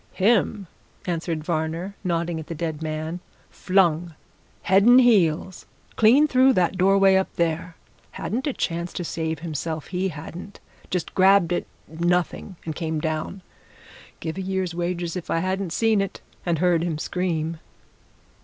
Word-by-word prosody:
"Him!" 205 0 +2 0.4
answered 165 -2 -2
Varner, 165 +4 -2
nodding 170 -2 -1
at 155 - -8
the 165 - -5
dead 160 -1 -4
man. 155 +2 -3 0.3
"Flung, 175 -3 +1 0.5
head 190 +1 +4
and 245 +4 +7
heels, 185 -7 +2 0.3
clean 255 +8 +5
through 260 -1 +5
that 185 -3 +1
doorway 195 +1 +4
up 190 - 0
there. 170 0 -1 0.4
Hadn't 250 +7 -3
a 285 - 0
chance 170 -3 -3
to 175 - -4
save 160 -1 -3
himself, 160 -1 -4
he 185 +1 -1
hadn't! 170 +4 -8 0.3
Just 180 -2 -3
grabbed 190 -2 +5
at - - -1 0.2
nothing! 175 +3 -1
and 160 -2 -4
came 160 -2 -2
down. 155 +5 -3 0.8
Give 160 +2 -5
a - - -2
year's 190 -2 -2
wages 175 0 -2
if 180 - -6
I - - +1
hadn't 185 +1 -1
seen 220 +2 +2
it 195 - -4 0.3
and 170 -1 +2
heard 175 0 +2
him 170 -3 -2
scream." 165 -1 -2
175 Hz, 150 wpm, -24 LUFS, 160-190 Hz, 0.8 s, and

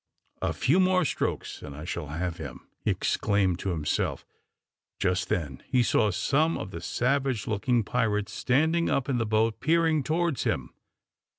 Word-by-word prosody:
"A - - 0
few 150 +9 +2
more 185 -1 +3
strokes, - - -2
and 70 - -8
I 75 +2 -7
shall 75 - -4
have 85 +3 -3
him," 70 -6 -8 0.2
he - - +1
exclaimed 95 -4 +1
to 100 - -2
himself. 80 -4 -1 0.7
Just 90 -1 0
then 75 -7 -2
he 125 -1 +3
saw 110 -2 +3
some 145 - +1
of 95 - -6
the 85 - -6
savage 125 +5 0
looking 115 +2 +1
pirates 105 -2 0
standing 160 +6 +2
up 135 0 0
in 125 -3 +1
the 115 - 0
boat 110 +1 +1
peering 160 +2 +3
towards 160 -1 0
him. - - -2
115 Hz, 165 wpm, -27 LUFS, 90-140 Hz, 0.7 s, more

